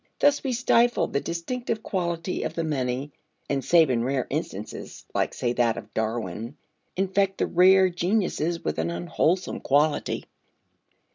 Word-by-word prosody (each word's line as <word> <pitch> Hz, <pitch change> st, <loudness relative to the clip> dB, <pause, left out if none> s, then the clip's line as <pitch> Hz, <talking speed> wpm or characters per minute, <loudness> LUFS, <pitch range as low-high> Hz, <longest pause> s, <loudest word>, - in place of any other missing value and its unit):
Thus 290 Hz, 0 st, +3 dB
we 270 Hz, -, -1 dB
stifle 240 Hz, 0 st, +3 dB
the 140 Hz, -, -1 dB
distinctive 220 Hz, +6 st, -3 dB
quality 175 Hz, -1 st, -2 dB
of -, -, -3 dB
the 165 Hz, -, -1 dB
many, 135 Hz, -2 st, -2 dB, 0.4 s
and 140 Hz, -2 st, -1 dB
save 165 Hz, -5 st, +5 dB
in 115 Hz, -2 st, +1 dB
rare 130 Hz, 0 st, 0 dB
instances -, -, -5 dB
(like, -, -, 0 dB
say, 120 Hz, -1 st, -1 dB
that 120 Hz, -2 st, +1 dB
of -, -, -9 dB
Darwin) 110 Hz, +2 st, -3 dB, 0.4 s
infect 195 Hz, +1 st, +1 dB
the -, -, +1 dB
rare 190 Hz, +2 st, +6 dB
geniuses 175 Hz, -2 st, -1 dB
with 75 Hz, -, -1 dB
an 80 Hz, +1 st, 0 dB
unwholesome 90 Hz, -, 0 dB
quality. 145 Hz, +2 st, +1 dB
165 Hz, 145 wpm, -26 LUFS, 125-190 Hz, 0.4 s, rare